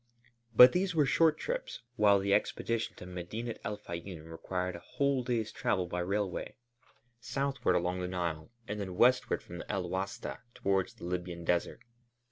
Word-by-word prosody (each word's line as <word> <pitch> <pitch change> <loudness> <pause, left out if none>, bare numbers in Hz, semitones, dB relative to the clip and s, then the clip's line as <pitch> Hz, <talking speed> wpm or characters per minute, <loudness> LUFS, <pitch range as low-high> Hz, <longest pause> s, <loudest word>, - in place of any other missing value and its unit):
But 125 +3 +11
these 180 -1 0
were 150 -3 +4
short 155 +3 +4
trips, - - -4
while 105 -4 +5
the 100 0 +1
expedition 115 +2 0
to - - -10
Medinet 90 +6 -5
el 105 0 -3
Fayûm 85 -4 -7
required 90 +2 -3
a - - -7
whole 140 +6 0
day's 115 -3 -1
travel 90 -2 0
by 90 0 -3
railway, 95 +1 -2 0.6
southward 135 +1 0
along 90 +1 0
the 90 - -2
Nile 85 -3 -3 0.2
and 105 +1 -3
then 95 -3 -4
westward 125 +5 +3
from 90 0 -8
El 95 -4 -1
Wasta 95 +2 -3 0.2
towards 95 -1 0
the - - -14
Libyan 90 -1 -3
Desert. 85 0 0
100 Hz, 160 wpm, -32 LUFS, 90-120 Hz, 0.6 s, But